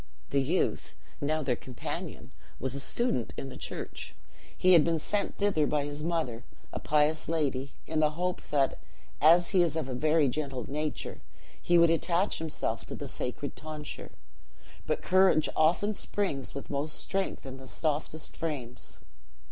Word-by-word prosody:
The 140 - +3
youth, 160 +8 0 0.3
now 155 +2 +1
their 130 -3 +1
companion, 125 0 -6 0.3
was 130 0 -1
a 140 - -2
student 140 - 0
in 135 - -4
the - - -9
church. - - -5 0.4
He 185 0 +6
had 165 -3 +8
been 165 +1 +2
sent 200 +6 -1
thither 190 -8 +2
by 150 -1 +1
his 145 +1 -4
mother, 155 -9 -1 0.3
a - - -2
pious 150 +1 +2
lady, 140 -4 0
in 160 0 -1
the 155 -1 +5
hope 180 +4 -2
that, 140 -2 +2 0.4
as 170 +3 +6
he 185 - +5
is 165 -3 +2
of 160 -4 -1
a 130 - -3
very 155 +3 +3
gentle 135 -2 -2
nature, 150 +2 -3 0.4
he 175 - +4
would 170 -1 +7
attach 170 +4 +2
himself 115 -8 -2
to - - -5
the 145 - -5
sacred 130 +1 -4
tonsure. 155 -1 -7 0.7
But - - 0
courage 185 -4 +5
often 175 +7 +3
springs 185 -12 -2
with 140 - -6
most 145 +2 -1
strength 195 -6 -2
in 130 0 -6
the 130 0 -10
softest 155 +2 -1
frames. 140 -7 -4
150 Hz, 165 wpm, -30 LUFS, 135-165 Hz, 0.7 s, had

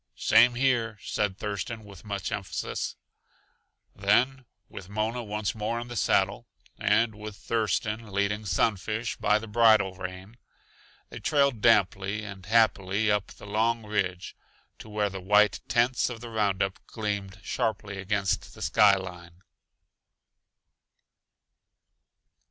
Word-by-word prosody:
"Same 120 +2 +5
here," 120 -4 +1
said 100 -3 -1
Thurston 105 +2 -4
with 100 -2 -13
much 100 -2 -4
emphasis. 100 -3 -3 1.0
Then, 125 +6 +2 0.2
with 100 -4 -10
Mona 110 +4 -2
once 105 -1 -2
more 110 +2 -2
in 120 +1 -7
the 120 - -6
saddle, 100 +2 +1 0.3
and 115 0 +2
with 105 -1 -8
Thurston 110 0 -1
leading 100 +2 -1
Sunfish 110 +5 0
by 105 - +3
the 110 - -6
bridle 110 -3 +4
rein, 95 +4 -8 0.7
they - - -7
trailed 140 -7 +2
damply 105 -2 +3
and 95 -3 -9
happily 105 -2 +2
up 105 -1 +1
the - - -13
long 110 +2 0
ridge 95 -4 -2 0.4
to 110 - -11
where 105 -1 -1
the 95 0 -6
white 105 +2 +4
tents 120 +2 +2
of 120 -2 -7
the 120 0 -9
roundup 100 -3 0
gleamed 100 -3 -4
sharply 105 -3 -2
against 100 0 -1
the - - -7
sky 105 -2 +5
line. 90 -1 -9
105 Hz, 125 wpm, -27 LUFS, 100-115 Hz, 1.0 s, Same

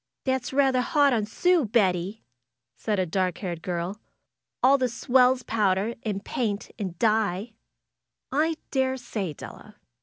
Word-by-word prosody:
^'That's 260 -2 -1
rather 265 -2 +3
hard 285 +1 +3
on 215 -3 0
Sue, 355 +8 +2
Betty 200 -3 0 0.5
said 215 -2 -2
a 185 - +1
dark 180 0 -1
haired 175 -4 -5
girl. 180 +4 -4 0.6
^^All 275 +2 +6
the 255 -1 +1
swells 250 +2 +3
powder, 210 0 +1
and 205 -2 -4
paint, 215 -5 -2
and 185 -5 -4
dye." 215 0 +1 1.2
daresay, 260 - -1
Della. - - -11
220 Hz, 125 wpm, -26 LUFS, 190-255 Hz, 1.2 s, ^^All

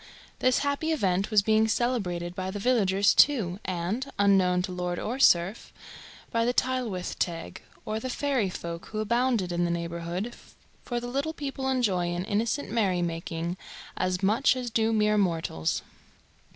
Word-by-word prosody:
This 255 0 +3
happy 285 +3 0
event 195 - +1
was 210 -2 +4
being 220 +1 +3
celebrated 195 -8 -1
by 185 +1 -4
the 195 - -4
villagers 200 -4 +3
too, 205 -11 +3
and, 190 +9 -2
unknown 190 -3 +3
to 185 - -4
lord 180 -1 -3
or 245 +8 -3
serf, 180 -2 +3 0.6
by 230 0 +1
the 245 +1 0
"Tylwyth 245 -8 -1
Teg," 170 -2 -3 0.2
or 215 0 -2
the 255 - -5
fairy 260 -6 0
folk 170 -1 -6
who 215 - -7
abounded 235 -3 +1
in 175 0 0
the 175 - +1
neighbourhood, 170 +5 -3 0.5
for 240 -1 -2
the 240 - -7
little 275 +6 -2
people 275 -3 -3
enjoy 205 -9 +1
an 180 +1 -3
innocent 230 +8 -1
merry 190 -6 +1
making 165 +1 -3 0.4
as 185 +1 -1
much 225 +8 +3
as 250 -2 -4
do 225 0 +2
mere 210 -1 +3
mortals. 165 - -1
205 Hz, 160 wpm, -27 LUFS, 180-245 Hz, 0.6 s, was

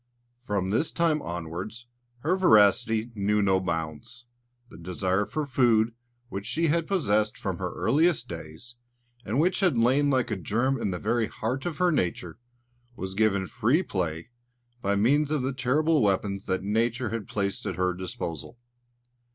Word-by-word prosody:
From 100 -6 -2
this 150 +9 +1
time 165 -3 +1
onwards, 90 - -6 0.4
her 165 +7 +1
voracity 110 - +4
knew 105 0 +1
no 95 -2 +3
bounds. 80 - -5 0.4
The - - -13
desire 95 +3 -1
for 155 0 -2
food, 120 -4 +3 0.3
which 100 -3 -6
she 160 +7 +1
had 165 +1 +1
possessed 110 - +1
from - - -4
her - - -3
earliest 155 -4 +2
days, 80 +8 -9 0.5
and 120 +5 -1
which 180 +4 +2
had 180 -10 +2
lain 130 +5 +3
like 130 -3 +1
a - - +1
germ 120 +9 0
in - - 0
the 90 - -2
very 115 +3 0
heart 130 +8 -3
of 170 - -4
her 180 -1 +3
nature, 90 - -2 0.6
was 95 -2 -5
given 100 -2 +2
free 120 - +1
play 85 - -3 0.5
by 100 +1 +1
means 140 +8 +3
of 150 -4 0
the 130 +1 -1
terrible 145 +4 +2
weapons 100 0 0
that 95 0 -1
Nature 115 +4 0
had 115 -1 -4
placed 100 -1 -2
at - - -2
her 90 0 +1
disposal. 90 - -6
110 Hz, 160 wpm, -27 LUFS, 95-135 Hz, 0.6 s, voracity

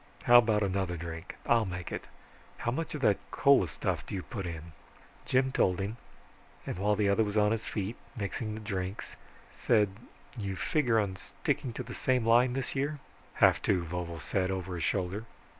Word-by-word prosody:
How 120 0 +9
about 110 -3 +2
another 95 -2 -1
drink? 85 +2 -7
I'll 115 -3 +3
make 90 -1 -5
it. - - -4 0.5
How 120 - -1
much 160 +5 -3
of 150 - -5
that 105 -6 +3
cola 140 -10 +4
stuff 70 - -2
do - - -6
you 95 - -3
put 100 -8 -5
in?" 85 0 -7 0.6
Jim 130 +1 +2
told 90 -7 +2
him, 100 +4 -3 0.7
and - - -4
while 105 +2 +2
the 105 -1 +2
other 100 +3 +4
was 105 0 -2
on 105 0 +4
his 115 0 -2
feet 105 +2 -3 0.2
mixing 110 +1 -3
the 110 - -7
drinks, 95 -1 -4 0.4
said, 105 -4 +3 0.5
"You 100 -5 -3
figure 125 - +1
on 95 -3 -1
sticking 145 +5 -2
to - - -4
the - - -8
same 130 -3 +1
line 120 +2 +5
this 135 +1 -3
year?" 145 +3 -1 0.4
"Have - - +5
to," 90 -3 +2
Vovo 85 0 -4
said 95 +2 -1
over 95 -1 -3
his 85 -2 -3
shoulder. 95 +4 -1
105 Hz, 190 wpm, -30 LUFS, 95-120 Hz, 0.7 s, How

